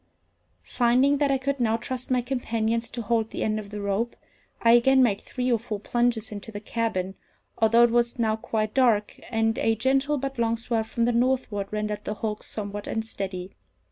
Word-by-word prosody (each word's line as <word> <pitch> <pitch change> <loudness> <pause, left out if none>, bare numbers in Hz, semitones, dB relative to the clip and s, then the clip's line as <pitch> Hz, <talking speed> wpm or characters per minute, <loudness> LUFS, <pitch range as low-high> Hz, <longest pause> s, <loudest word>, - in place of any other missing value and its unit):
Finding 255 - +3
that 290 -1 +2
I 270 - +3
could 275 +1 -2
now 225 -2 +2
trust 255 +2 -5
my 250 -1 +2
companions 230 -2 -1
to 235 - -5
hold 225 0 0
the - - -3
end 215 0 0
of 205 -1 -8
the 210 0 -6
rope, 200 +4 -1 0.4
I 230 - +4
again 260 +3 +6
made 205 -5 +1
three 250 -1 -2
or 235 - +3
four 215 -2 -5
plunges 235 0 0
into 210 +1 -7
the 205 - -6
cabin, 210 -4 -2 0.5
although 230 +1 +5
it 240 - +4
was 240 +1 +1
now 220 -2 +1
quite 215 -1 -2
dark, 230 -6 +2
and 225 -1 +1
a 225 - +2
gentle 270 +5 +1
but 270 -1 -4
long 230 0 +1
swell 230 -1 -1
from 230 +1 0
the 240 - +2
northward 240 -4 0
rendered 210 0 -3
the 210 - -3
hulk 215 -1 -3
somewhat 205 -1 -6
unsteady. 195 -4 -4
230 Hz, 195 wpm, -26 LUFS, 215-245 Hz, 0.5 s, again